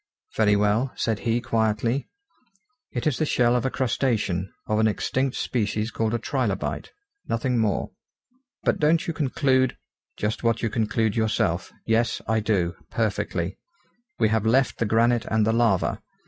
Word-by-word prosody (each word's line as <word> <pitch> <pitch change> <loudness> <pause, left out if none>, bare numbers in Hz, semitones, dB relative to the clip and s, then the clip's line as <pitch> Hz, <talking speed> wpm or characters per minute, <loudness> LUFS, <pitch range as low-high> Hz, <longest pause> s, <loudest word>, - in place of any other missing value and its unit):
"Very 105 -2 +4
well," 105 +6 +2
said 110 -2 -1
he 115 +1 +2
quietly, 115 +2 0 0.8
"it 120 - -3
is 150 -5 +1
the - - +2
shell 120 -3 +3
of 125 +1 +1
a - - 0
crustacean, 115 -8 -1
of 105 0 0
an 110 - +4
extinct 130 +5 -1
species 110 -1 -1
called 110 +1 -1
a - - +2
trilobite. 115 -5 -2 0.4
Nothing 120 +1 0
more." 105 -4 0 0.7
"But - - +1
don't 160 +4 +3
you 170 - -2
conclude 130 -3 +1 0.2
?" - - -56
"Just 105 +3 -2
what 115 0 +1
you 115 - 0
conclude 110 -1 0
yourself. 105 -6 0
Yes; 115 +1 +1
I 110 0 +2
do, 95 -5 0 0.2
perfectly. 95 -5 -2 0.6
We 110 - +3
have 110 -1 +1
left 125 +4 +2
the 115 - +1
granite 115 +2 +3
and 110 -1 +1
the 110 - +2
lava. 115 -5 +2
115 Hz, 160 wpm, -25 LUFS, 105-125 Hz, 0.8 s, Very